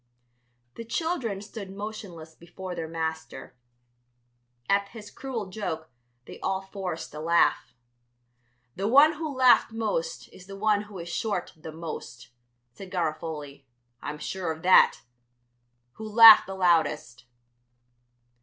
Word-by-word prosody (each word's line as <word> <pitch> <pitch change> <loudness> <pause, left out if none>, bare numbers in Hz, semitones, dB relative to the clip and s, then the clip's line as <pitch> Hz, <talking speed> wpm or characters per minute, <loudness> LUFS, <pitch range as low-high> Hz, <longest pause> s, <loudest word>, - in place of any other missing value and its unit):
The 230 - -6
children 235 - -3
stood 205 -1 -9
motionless 195 -5 -8
before 180 +3 -9
their 165 -2 -5
master. 160 -3 -5 1.1
At 200 0 +2
his 210 -1 -12
cruel 255 -6 -5
joke 160 -7 -5 0.3
they - - -11
all 190 0 -2
forced 190 -5 -6
a 150 - -7
laugh. 165 -3 +1 1.0
"The 195 +2 -2
one 285 +7 +6
who 310 0 -5
laughed 255 -4 +4
most 485 - -3
is 185 - -16
the 195 0 -9
one 210 0 +2
who 200 - -10
is 170 -1 -7
short 180 +1 -3
the 160 0 -10
most," 155 -7 -8 0.4
said 195 +6 -11
Garofoli; 155 -5 -4 0.3
"I'm 150 +1 -6
sure 175 +1 -4
of 160 0 -8
that. 185 +1 +5 1.0
Who 220 0 -7
laughed 225 -1 +9
the 190 - -6
loudest?" 160 -9 0
190 Hz, 125 wpm, -26 LUFS, 160-220 Hz, 1.1 s, laughed